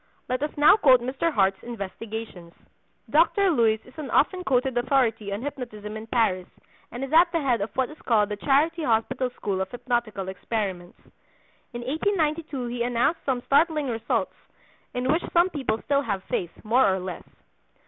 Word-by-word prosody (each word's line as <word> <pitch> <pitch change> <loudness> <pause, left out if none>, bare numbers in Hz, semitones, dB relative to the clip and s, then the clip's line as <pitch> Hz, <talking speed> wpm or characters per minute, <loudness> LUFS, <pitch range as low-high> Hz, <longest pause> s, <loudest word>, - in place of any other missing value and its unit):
Let 255 +1 -2
us 295 - 0
now 295 +8 +7
quote 260 - +5
Mr. 265 +7 -1
Hart's 195 -5 +1
investigations. 215 -4 -7 0.5
Dr. 350 +5 +3
Luys 225 -6 +2
is 255 - -16
an 300 -4 -6
often 365 +8 +2
quoted 260 -3 +1
authority 240 -5 +1
on 205 +4 -4
hypnotism 235 -7 -6
in 220 +1 -7
Paris, 220 -6 +1 0.4
and 245 +3 -5
is 270 - -5
at 340 +2 +6
the 335 - +1
head 255 -7 +1
of 205 - -2
what 260 +1 0
is 305 - -13
called 215 -3 +2
the 210 - -2
Charity 300 +9 +2
Hospital 235 +1 0
school 195 -2 -2
of 190 - -3
hypnotical 235 -5 -2
experiments. 190 -2 -4 0.8
In 240 - -5
1892 310 -1 -1
he 240 0 -4
announced 245 +7 +1
some 250 -2 0
startling 300 -1 +2
results, 225 -2 -1 0.6
in 250 +1 -1
which 320 +5 +2
some 350 +2 +4
people 255 -8 -2
still 280 0 +2
have 200 -8 -3
faith 175 - -2 0.2
(more 235 0 +4
or 190 - 0
less). 185 -1 -6
245 Hz, 170 wpm, -25 LUFS, 215-290 Hz, 0.8 s, now